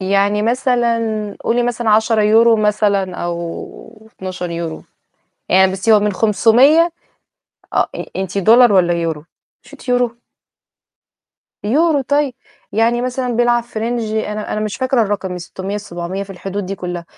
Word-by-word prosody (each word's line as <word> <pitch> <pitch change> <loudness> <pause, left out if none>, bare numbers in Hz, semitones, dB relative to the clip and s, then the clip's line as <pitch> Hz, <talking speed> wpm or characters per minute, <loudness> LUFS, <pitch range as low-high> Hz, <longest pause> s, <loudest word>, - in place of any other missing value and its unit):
يعني 200 +2 +1
مثلًا 240 0 +1 0.4
قولي 240 +1 0
مثلًا 240 -2 -1
10€ 220 +1 +4
مثلًا 205 -3 +1
أو 175 +6 -7
12€، 170 -3 -5 0.7
يعني 190 +1 +4
بُصّي 195 +4 0
هو 210 - +6
من 205 -1 0
500 245 - +4 0.8
آه، - - +1
أ - - -5
أنتِ 190 +1 -3
دولار 230 +4 +6
والَّا 180 -3 +3
يورو؟ 165 -3 -3 0.4
مش - - -18
أنتِ - - -14
يورو؟ 245 -1 +1 1.5
يورو، 295 +7 +2
طيب. 285 0 0 0.4
يعني 230 +3 +1
مثلًا 250 -1 -2
بيلعب 240 0 +2
في 235 -2 -8
range 225 -2 -2
أنا 210 0 -4
أنا 215 - -2
مش 215 -1 -3
فاكرة 260 -2 +1
الرقم، 200 -3 -2
من 180 - -5
600 190 +3 -6
ل700 185 -1 -5
في 195 - -10
الحدود 195 +1 -5
دي 195 - -4
كُلّها، 175 -2 -6
215 Hz, 145 wpm, -17 LUFS, 190-240 Hz, 1.5 s, هو